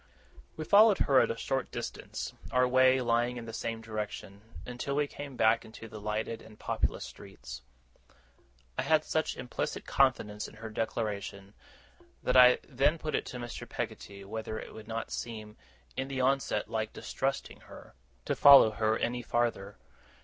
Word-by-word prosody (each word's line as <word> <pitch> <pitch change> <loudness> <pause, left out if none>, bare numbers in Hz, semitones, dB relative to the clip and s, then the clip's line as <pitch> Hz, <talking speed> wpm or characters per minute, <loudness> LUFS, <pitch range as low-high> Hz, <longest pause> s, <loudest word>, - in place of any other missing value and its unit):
We 155 - -4
followed 210 +1 +7
her 135 -2 +4
at - - +3
a 115 - -2
short 135 +2 -2
distance, 120 - -5 0.2
our 125 +1 +3
way 130 +1 +5
lying 120 +1 +1
in 120 - -6
the 115 - -8
same 115 0 -4
direction, 105 -2 -6 0.2
until 125 +3 -4
we 145 0 +2
came 145 -1 -8
back 115 -1 +3
into 115 0 -11
the 110 -1 -9
lighted 110 +2 -3
and 110 -1 -15
populous - - -1
streets. - - -10 1.2
I - - +4
had 155 -1 +2
such 155 0 -1
implicit 125 - -4
confidence 105 -6 +1
in - - -14
her 110 0 -8
declaration, 105 -3 -3 0.7
that 125 - +1
I 125 -1 +8
then 145 +4 +2
put 155 -1 -4
it - - -1
to 125 - -6
Mr. 120 -1 -7
Peggotty, 100 0 -6
whether 110 +1 -5
it - - -8
would 110 -1 -11
not 115 0 -4
seem, 110 -2 -6 0.4
in 130 +1 -2
the 135 -1 -4
onset, 130 -5 +1
like 110 -1 -3
distrusting 135 +1 -3
her, - - -14 0.3
to - - 0
follow 140 -6 +9
her 110 0 +1
any 120 +1 -1
farther. 115 -4 -1
115 Hz, 165 wpm, -30 LUFS, 110-130 Hz, 1.2 s, follow